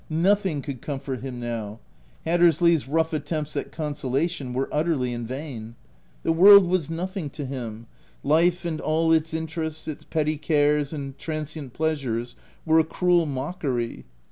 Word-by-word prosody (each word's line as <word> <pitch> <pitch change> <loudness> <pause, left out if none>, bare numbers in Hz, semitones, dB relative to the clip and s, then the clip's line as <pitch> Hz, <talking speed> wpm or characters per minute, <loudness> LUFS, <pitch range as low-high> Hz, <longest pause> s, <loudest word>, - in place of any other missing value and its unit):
Nothing 175 -2 +1
could 140 -5 -6
comfort 135 -3 -4
him 130 -2 -6
now: 115 -3 -4 0.5
Hattersley's 170 -2 +4
rough 160 +3 +1
attempts 155 0 -3
at - - -3
con 150 -2 -3
solation 140 0 -2
were 130 +2 -1
utterly 150 -6 0
in 120 -1 -4
vain. 125 -4 -6 0.5
The - - +2
world 195 +4 +9
was 175 -3 0
nothing 175 0 -3
to 145 +1 -6
him: 120 -4 -6 0.4
life 170 +4 +3
and 160 -2 -2
all 160 +1 +1
its 160 0 +2
interests, 160 -1 -4
its 155 - -5
petty 155 -1 -1
cares 150 -2 +2
and 140 -3 -5
transient 155 -4 -5
pleasures 130 -7 -2 0.3
were 160 0 +5
a - - +5
cruel 175 +1 +2
mockery. 135 -4 -3
155 Hz, 150 wpm, -25 LUFS, 135-165 Hz, 0.5 s, world